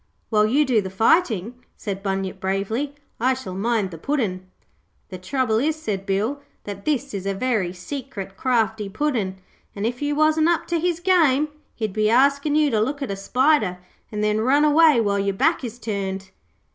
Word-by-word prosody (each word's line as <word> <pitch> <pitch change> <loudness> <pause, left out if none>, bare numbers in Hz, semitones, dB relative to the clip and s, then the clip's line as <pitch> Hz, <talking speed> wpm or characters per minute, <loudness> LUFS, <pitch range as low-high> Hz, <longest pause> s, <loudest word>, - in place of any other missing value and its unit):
'While 215 -1 +3
you 285 +7 +3
do 240 -5 +2
the 190 - -5
fighting,' 225 - +1
said 195 -2 -5
Bunyip 195 -1 -3
bravely, 200 +9 -2 0.2
'I 255 +3 +2
shall 225 -8 -7
mind 210 0 0
the 165 - -9
Puddin'.' 190 - -2 0.6
'The 185 - -7
trouble 225 +2 0
is,' 300 +5 +1
said 210 -10 -4
Bill, 215 +9 -1 0.2
'that 200 -1 -8
this 280 -3 -1
is 195 -1 -4
a 195 - -1
very 215 -5 0
secret, 195 0 -7
crafty 220 -4 0
Puddin', 215 -5 -1 0.4
an' 200 +1 -3
if 245 +3 -2
you 290 0 0
wasn't 310 +1 +3
up 345 - +1
to 340 -1 +1
his 345 0 0
game 305 -6 +3 0.3
he'd 215 -4 -3
be 215 0 +2
askin' 280 +4 +3
you 300 -2 +3
to 215 -2 +2
look 280 +5 -1
at 225 - -3
a - - -2
spider 235 -2 +2 0.3
an' 210 -1 -3
then 210 0 +1
run 280 +6 +4
away 300 -3 +5
while 200 -3 +1
your 200 0 0
back 320 - +2
is 235 -1 -5
turned.' 195 -4 -4
225 Hz, 185 wpm, -23 LUFS, 195-285 Hz, 0.6 s, away